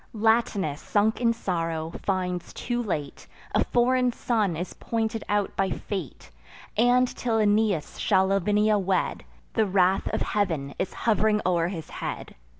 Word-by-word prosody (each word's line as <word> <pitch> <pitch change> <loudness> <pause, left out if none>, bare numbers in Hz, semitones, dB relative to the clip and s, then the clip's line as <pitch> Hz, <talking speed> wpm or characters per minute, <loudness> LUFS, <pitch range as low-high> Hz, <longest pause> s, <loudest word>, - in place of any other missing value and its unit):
Latinus, 215 -8 +1
sunk 215 +3 +1
in 235 -1 +4
sorrow, 165 -7 -2
finds 180 -2 -2
too 240 0 -2
late, 155 -10 -4 0.3
A - - +3
foreign 250 +1 +2
son 215 -8 0
is 175 +3 -4
pointed 225 -1 -2
out 205 -1 0
by 195 -1 +1
fate; 185 - -5 0.4
And, 245 +3 +4
till 235 -2 -2
Aeneas 210 -5 +1
shall 190 -2 +3
Lavinia 205 +2 +2
wed, 190 -1 0 0.3
The 220 - +2
wrath 190 0 +2
of - - -1
Heav'n 160 -9 -1
is - - -1
hov'ring 215 -1 +3
o'er 170 -2 +2
his 170 -4 -6
head. - - -5
205 Hz, 145 wpm, -26 LUFS, 180-225 Hz, 0.4 s, in